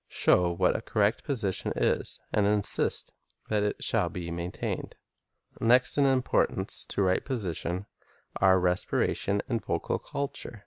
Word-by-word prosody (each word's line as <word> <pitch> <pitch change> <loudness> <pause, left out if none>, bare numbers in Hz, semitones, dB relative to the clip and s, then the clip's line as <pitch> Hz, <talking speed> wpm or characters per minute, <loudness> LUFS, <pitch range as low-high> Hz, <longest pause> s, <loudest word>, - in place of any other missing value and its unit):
Show 90 -1 +3
what - - +1
a - - -2
correct 105 0 0
position 110 -10 -2
is, - - 0
and 105 -1 +2
insist 105 -1 0 0.4
that 105 -1 +1
it 105 0 -2
shall - - +1
be 85 -2 -6
maintained. 85 +1 -5 0.6
Next 125 +2 +5
in 140 -1 +3
importance 130 -2 +2
to 100 - 0
right 95 0 +1
position 95 - -3 0.5
are 95 -1 +4
respiration 95 +2 0
and 115 -4 -2
vocal - - -2
culture. 140 -5 -5
100 Hz, 135 wpm, -28 LUFS, 90-115 Hz, 0.6 s, Next